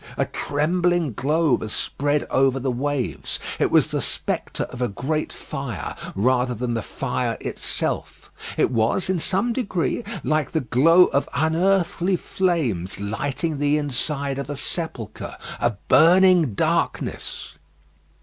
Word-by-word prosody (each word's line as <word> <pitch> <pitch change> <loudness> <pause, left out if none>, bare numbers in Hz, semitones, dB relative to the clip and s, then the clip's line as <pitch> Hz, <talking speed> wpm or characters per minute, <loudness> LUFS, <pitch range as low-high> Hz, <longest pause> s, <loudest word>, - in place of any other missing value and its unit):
A - - +2
trembling 170 0 0
glow 150 +5 +2
was 110 - -1
spread 145 +5 -1
over 135 0 +3
the 130 0 -1
waves. 130 - -2 0.2
It - - +3
was - - +3
the - - 0
spectre - - -3
of 125 - -8
a 125 - +2
great 135 +10 -2
fire, 125 - -5 0.2
rather 125 +4 +2
than 120 +1 -2
the 115 - -1
fire - - -2
itself. - - -4 0.3
It - - +2
was 120 +11 +1
in 185 - 0
some 200 +8 +1
degree 195 - -1 0.2
like 155 -3 0
the 160 - +1
glow 165 +9 +5
of 140 - 0
unearthly 175 +4 +2
flames 150 - -1
lighting 140 +9 -2
the 145 +1 +2
inside 140 -1 -1
of 140 0 -5
a 145 - -4
sepulchre. 160 - -4 0.2
A 120 - +1
burning 175 - +5
darkness. - - -2
145 Hz, 135 wpm, -23 LUFS, 125-170 Hz, 0.3 s, glow